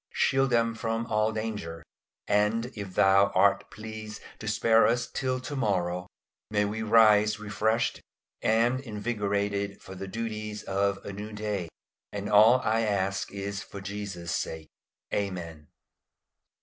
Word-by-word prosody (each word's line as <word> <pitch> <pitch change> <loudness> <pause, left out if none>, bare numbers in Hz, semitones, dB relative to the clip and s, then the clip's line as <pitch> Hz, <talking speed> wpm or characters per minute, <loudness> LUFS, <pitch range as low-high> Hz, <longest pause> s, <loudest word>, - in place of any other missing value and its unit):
Shield 135 0 +2
them 115 -1 +2
from 115 0 -2
all 110 0 +1
danger; 105 -7 -4 0.4
and 105 +4 +1
if 100 -3 -7
Thou 100 +1 +5
art - - +3
pleased 110 -1 -8 0.2
to 110 - -7
spare 110 +1 +4
us 120 +1 +1
till 130 +1 -2
to 145 +3 -5
morrow, 90 -7 0 0.4
may 105 -1 +2
we 105 +2 -3
rise 105 -1 +5
refreshed 110 +2 0 0.4
and 115 +3 +3
invigorated 100 -4 -2
for 95 - -11
the 95 +1 -6
duties 105 0 -4
of 100 +1 0
a 100 - -5
new 105 +2 -6
day. 105 -5 -3 0.4
And 100 0 -4
all 110 +5 +7
I 115 -1 +1
ask 100 -2 -1
is 100 0 -4
for 100 - -9
Jesus' 95 -3 -5
sake. 80 -1 -4 0.4
Amen. 85 -7 -3
105 Hz, 135 wpm, -28 LUFS, 100-110 Hz, 0.4 s, all